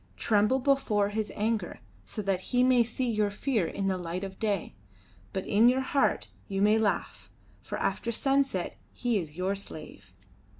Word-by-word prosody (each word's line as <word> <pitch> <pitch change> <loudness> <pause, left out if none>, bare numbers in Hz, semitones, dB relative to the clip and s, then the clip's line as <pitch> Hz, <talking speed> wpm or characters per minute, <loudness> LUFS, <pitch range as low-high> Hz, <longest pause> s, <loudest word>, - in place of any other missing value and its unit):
Tremble 210 - +3
before 250 -7 +2
his 215 0 -2
anger, 215 -3 -1 0.3
so 210 - -5
that 190 -2 0
he 250 0 +3
may 250 -2 +5
see 245 +2 -2
your 215 -3 +1
fear 210 - 0
in 200 - -3
the 190 -1 0
light 175 +2 -4
of 190 -1 -7
day; 205 -5 -1 0.6
but 190 - -3
in 220 +4 +5
your 260 +1 +2
heart 275 +1 +1 0.2
you 195 -1 -2
may 210 +2 +4
laugh, 215 -2 -1 0.3
for - - -5
after 235 - -1
sunset 270 -5 0
he 240 -4 0
is 160 -3 -7
your 185 +2 0
slave." 175 -6 -9
210 Hz, 170 wpm, -29 LUFS, 195-245 Hz, 0.6 s, may